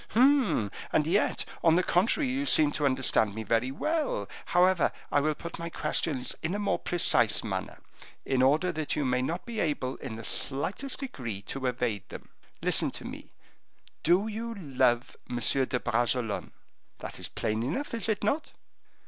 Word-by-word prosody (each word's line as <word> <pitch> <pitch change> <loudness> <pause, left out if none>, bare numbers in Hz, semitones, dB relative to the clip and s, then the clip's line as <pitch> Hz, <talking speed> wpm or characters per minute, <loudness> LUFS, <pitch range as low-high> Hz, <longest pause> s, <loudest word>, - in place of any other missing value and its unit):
"Hum! 250 - +4 0.2
and 150 - +2
yet, 185 +6 +1 0.2
on 165 -1 +5
the 180 - +3
contrary, 225 - +2
you 270 +3 -1
seem 150 - +5
to 145 -1 +1
understand 130 -6 +2
me 110 - -4
very 115 +4 +1
well. 325 - -1 0.2
However, 180 -1 +3 0.2
I - - +4
will 155 +1 +1
put 170 +3 -8
my 170 0 -4
questions 145 -5 -1
in 165 +4 -2
a - - -1
more 205 -1 0
precise 175 -1 +2
manner, - - -4 0.5
in 130 -1 +1
order 150 +7 +3
that 155 -2 -2
you 145 - 0
may 125 0 +1
not 165 +7 -3
be 235 -2 -5
able, 135 -6 -1
in 125 -5 -6
the 115 - -8
slightest 190 - +1
degree, 115 - -5
to 130 +5 -3
evade 120 -6 -2
them. - - -10 0.3
Listen - - +2
to - - -6
me: - - -9 0.7
Do 180 +5 +3
you 225 +2 -4
love 130 - 0
M. 125 - -3
de 130 +1 +2
Bragelonne? 120 -2 -1 0.4
That - - -8
is - - -2
plain 110 +1 -2
enough, 170 - -3
is 230 -1 -1
it 215 - 0
not?" 280 +10 -1
150 Hz, 175 wpm, -29 LUFS, 125-205 Hz, 0.7 s, on